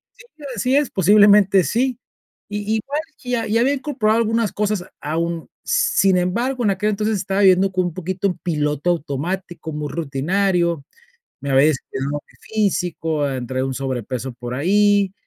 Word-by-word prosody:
Sí, 480 -12 -15
así 250 +5 +1
es, 290 -2 +2
posiblemente 200 0 +5
sí, 250 +6 0 0.5
i 205 +1 -2
igual 275 +7 -2 0.2
que 250 - -9
ya 230 -2 0
ya 230 +2 +2
había 270 +4 +3
incorporado 250 -6 0
algunas 225 -1 +1
cosas 210 -3 -1 0.2
a 155 +2 -3
un 170 -1 -2 0.2
sin 475 - +2
embargo, 235 +9 -1
en 205 - +3
aquel 210 +3 0
entonces 215 +1 0
estaba 195 +1 -1
viviendo 190 0 +5
con 185 -1 0
un 175 - -3
poquito 185 +2 -2
en 180 - -2
piloto 150 -1 -1
automático, 170 +2 -4
muy 150 -1 -4
rutinario. 170 +2 0 0.6
Me 140 - -3
había 135 +2 +5
descuidado 135 -2 -2
en - - -3
lo 145 - -2 0.2
físico, 175 -8 -1
entré 130 -1 -4
a 130 - 0
un 135 - -3
sobrepeso 130 -1 -4
por 120 +1 -6
ahí. 200 +5 +3
190 Hz, 170 wpm, -20 LUFS, 155-215 Hz, 0.6 s, posiblemente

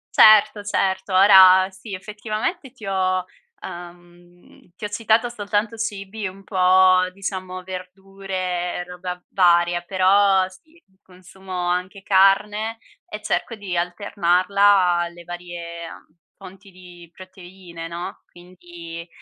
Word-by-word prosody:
Certo, 215 -1 +6
certo, 190 -1 -1
ora 190 -1 +7
sì, 195 +1 -9
effettivamente 215 - -5
ti 235 -4 -13
ho 185 -1 0 0.4
uhm, 175 0 -13
ti 210 - -7
ho - - -1
citato 225 +2 +1
soltanto 210 0 -2
cibi 210 -2 -5
un 195 +1 -11
po' 185 -1 +4
diciamo 185 -1 -6
verdure 185 -1 -5
e 180 - -4
roba 180 0 -7
varia, 175 -1 +3
però, 190 +1 +3
sì 315 - -21 0.2
consumo 185 +1 -16 0.2
anche 180 +2 -3
carne 210 +3 +2 0.3
e 210 0 -8
cerco 230 +2 -2
di 200 -4 -6
alternarla 180 +2 -1 0.4
alle 175 0 -5
varie, 170 -1 -8
uhm, 155 - -15 0.2
fonti 195 +1 -14
di 180 -2 -15
proteine, 185 -2 -11
no? 170 +1 -7
Quindi, 175 -1 -12
185 Hz, 115 wpm, -21 LUFS, 175-200 Hz, 0.4 s, ora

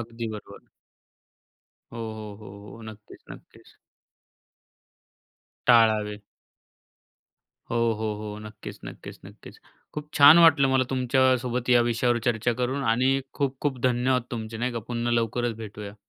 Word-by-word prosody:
अगदी 115 0 -6
बरोबर. 105 - -13 1.3
हो, 115 - -8
हो, 110 -2 -7
हो, 100 -1 -12
हो. 115 - -13
नक्कीच, 110 -1 -13
नक्कीच. - - -15 1.9
टाळावे. 110 -3 +4 1.5
हो, 115 - -1 0.2
हो, 110 - -3
हो, 105 0 -7
नक्कीच, 105 -1 -10
नक्कीच, - - -10
नक्कीच. - - -14 0.4
खूप 150 0 -7
छान 145 +3 +8
वाटलं 160 -5 +6
मला 130 -1 +2
तुमच्यासोबत 130 -1 +1
या 120 -1 +6
विषयावर 120 0 +1
चर्चा 120 0 +1
करून 130 +3 -1
आणि 130 +4 +2
खूप-खूप 135 -1 -2
धन्यवाद 125 0 +1
तुमचे, 110 -1 -5
नाही 120 +2 -2
का. 120 - -3
पुन्हा 120 0 -2
लवकरच 120 +1 -2
भेटूया. 105 -1 -9
120 Hz, 125 wpm, -25 LUFS, 110-130 Hz, 1.9 s, छान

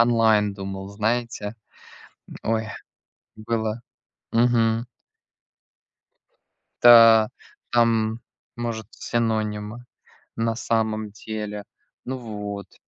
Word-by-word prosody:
онлайн 110 -3 +4
думал, 95 0 -6
знаете. 110 0 -2 0.7
М, - - -10
ой, 110 0 0 0.7
было. 110 0 -2 0.5
Мгм. 115 0 +3 2.0
Да, 115 -2 +9 0.4
там, 115 -1 +2 0.4
может, 115 -3 -4
синонимы, 110 0 -2 0.5
на 115 0 0
самом 110 -2 -1
деле, 105 -1 -6 0.4
ну, 130 +1 -3
вот. 105 -4 -7
110 Hz, 75 wpm, -24 LUFS, 105-115 Hz, 2.0 s, Да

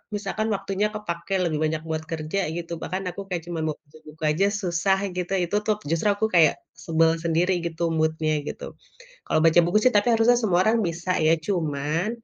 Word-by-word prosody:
misalkan 205 +2 -2
waktunya 195 +1 -1
kepake 185 -3 -5
lebih 155 -3 -1
banyak 155 0 -1
buat 160 0 -2
kerja 160 +4 -2 0.2
gitu, 170 0 -6
bahkan 185 +1 -3
aku 200 - -7
kayak 175 -4 -3
cuman 165 -2 -3
mau 155 - -2
baca 150 +2 -18
buku 155 +1 -12
aja 195 +6 +2
susah 180 +2 +1 0.2
gitu, 180 0 -3
itu 170 - -5
tuh 215 - +2
justru 165 +5 0
aku 210 +2 0
kayak 160 -2 +6 0.3
sebel 165 -1 +3
sendiri 170 +3 +1
gitu 170 0 -3
mood-nya 160 -1 0
gitu. - - -6 0.6
Kalau - - +1
baca 165 +1 +6
buku 175 +5 +3
sih 255 - +5
tapi 205 +4 +3
harusnya 230 +1 +4
semua 180 -5 +2
orang 225 0 +3
bisa 175 +1 -3 0.2
ya, 165 +1 +4
cuman, 160 -1 -1
170 Hz, 190 wpm, -24 LUFS, 160-195 Hz, 0.6 s, kayak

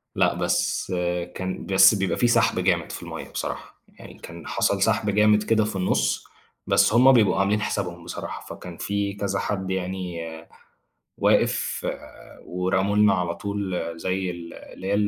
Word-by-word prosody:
لأ، - - +3
بس - - -1 0.4
كان 95 0 -4
بس 95 +2 +6
بيبقى 95 -1 -1
في 120 - +3
سحب 115 -4 +3
جامد 90 -2 +1
في - - -7
المَيّه - - -7
بصراحة، - - -6 0.2
يعني - - -11
كان 85 0 -10
حصل - - 0
سحب 105 - +1
جامد 105 +1 +4
كده 110 0 +2
في 105 - -4
النُص، 95 -1 0 0.4
بس - - +4
هُم 125 +3 +7
بيبقوا 110 -6 +4
عاملين 100 +2 +2
حسابهم 90 -5 -3
بصراحة، 85 - -7
فكان 90 -2 -10
في 100 0 -2
كذا 100 -1 -2
حد 95 -2 -3
يعني 95 -2 -3 1.0
واقف، - - +1 0.6
ورموا 95 +3 0
لنا 105 -1 +5
على 90 -2 -1
طول 100 -2 -4 0.2
زي 95 +1 -2
ال 85 -1 -8
اللي 95 - -11
هي 100 - +1
95 Hz, 155 wpm, -24 LUFS, 90-105 Hz, 1.0 s, هُم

